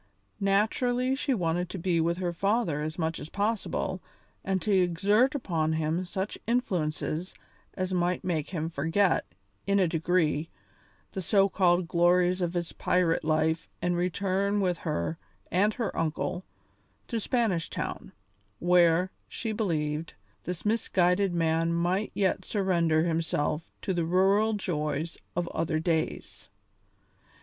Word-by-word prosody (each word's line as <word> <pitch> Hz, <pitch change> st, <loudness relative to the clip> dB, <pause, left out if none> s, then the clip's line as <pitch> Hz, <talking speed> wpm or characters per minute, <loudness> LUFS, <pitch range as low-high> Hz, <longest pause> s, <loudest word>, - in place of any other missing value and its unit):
Naturally 245 Hz, +6 st, +1 dB
she 275 Hz, +1 st, -1 dB
wanted 175 Hz, -2 st, -1 dB
to 195 Hz, -, -5 dB
be 170 Hz, -1 st, +1 dB
with 170 Hz, +1 st, +1 dB
her 180 Hz, -2 st, -2 dB
father 195 Hz, -4 st, 0 dB
as 155 Hz, +1 st, -4 dB
much 160 Hz, -1 st, -1 dB
as 155 Hz, -, -8 dB
possible 200 Hz, -2 st, -1 dB, 0.4 s
and 190 Hz, 0 st, 0 dB
to 210 Hz, -, 0 dB
exert 200 Hz, -, +3 dB
upon 160 Hz, -, 0 dB
him 160 Hz, +3 st, -1 dB
such 190 Hz, +3 st, -4 dB
influences 180 Hz, -7 st, -1 dB, 0.4 s
as 185 Hz, -1 st, -2 dB
might 180 Hz, 0 st, 0 dB
make 160 Hz, -5 st, -1 dB
him 160 Hz, -4 st, -2 dB
forget, 165 Hz, +5 st, +1 dB, 0.4 s
in 200 Hz, 0 st, +3 dB
a 190 Hz, -3 st, +4 dB
degree, 165 Hz, -1 st, +1 dB, 0.6 s
the 190 Hz, -, -4 dB
so 195 Hz, +2 st, +4 dB
called 180 Hz, -2 st, +2 dB
glories 180 Hz, +1 st, +3 dB
of 175 Hz, -1 st, -1 dB
his 170 Hz, -1 st, -2 dB
pirate 175 Hz, -2 st, +1 dB
life 155 Hz, +1 st, +1 dB
and 175 Hz, 0 st, 0 dB
return 195 Hz, +3 st, 0 dB
with 180 Hz, -3 st, 0 dB
her 85 Hz, -, -2 dB, 0.3 s
and 205 Hz, +5 st, +2 dB
her 230 Hz, -4 st, -2 dB
uncle 165 Hz, +3 st, -2 dB, 0.6 s
to 230 Hz, -, -2 dB
Spanish 215 Hz, -8 st, 0 dB
Town, -, -, -5 dB, 0.5 s
where, 175 Hz, +1 st, +4 dB, 0.2 s
she 225 Hz, -, -4 dB
believed, 160 Hz, -7 st, -2 dB, 0.3 s
this 180 Hz, +1 st, -5 dB
misguided 195 Hz, -3 st, +2 dB
man 165 Hz, -1 st, +1 dB
might 180 Hz, +5 st, 0 dB
yet 195 Hz, -2 st, +1 dB
surrender 170 Hz, -6 st, +1 dB
himself 160 Hz, -1 st, -1 dB
to 190 Hz, -, 0 dB
the 170 Hz, -2 st, 0 dB
rural 195 Hz, +5 st, +3 dB
joys 155 Hz, -5 st, -2 dB, 0.2 s
of 175 Hz, 0 st, -1 dB
other 160 Hz, -1 st, -1 dB
days. 160 Hz, -1 st, -2 dB
180 Hz, 135 wpm, -28 LUFS, 165-195 Hz, 0.6 s, a